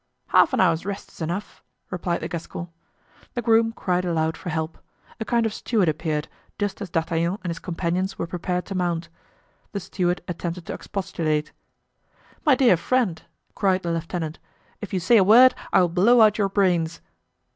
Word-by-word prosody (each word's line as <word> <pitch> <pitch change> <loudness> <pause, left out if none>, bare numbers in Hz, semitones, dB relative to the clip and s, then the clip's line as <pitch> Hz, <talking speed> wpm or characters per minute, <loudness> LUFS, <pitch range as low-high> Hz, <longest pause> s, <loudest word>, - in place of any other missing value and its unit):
"Half - - +5
an - - +1
hour's 165 0 +3
rest 200 +1 -6
is - - -15
enough," 175 +6 -4 0.3
replied 175 -1 -2
the - - -3
Gascon. 170 0 -6 0.7
The 240 - -1
groom 225 0 +4
cried 180 -5 -1
aloud 160 -2 0
for 180 - -7
help. 160 0 -3 0.4
A 220 - -3
kind 235 0 +1
of 220 - -1
steward 215 -6 0
appeared, 155 -1 -1 0.3
just 205 0 -2
as 200 - -5
D'Artagnan 165 +3 0
and 175 - -2
his 165 - -5
companions 185 +2 -2
were - - -2
prepared 180 +1 -3
to 195 - -6
mount. 170 -2 -1 0.6
The 200 - -2
steward 180 -1 -1
attempted 170 0 -4
to - - -5
expostulate. 155 -6 -2 0.9
"My 295 -5 +5
dear 250 -9 +5
friend," 215 -3 0 0.3
cried 190 -2 +1
the 170 - -1
lieutenant, 165 -1 -3 0.4
"if 210 - -6
you 190 - 0
say 205 +7 +4
a 200 - +6
word 240 +6 +8 0.2
I - - +5
will 175 - +2
blow 215 +8 +5
out 215 -1 +5
your 200 -1 +2
brains." 175 -5 +1
180 Hz, 180 wpm, -24 LUFS, 165-205 Hz, 0.9 s, word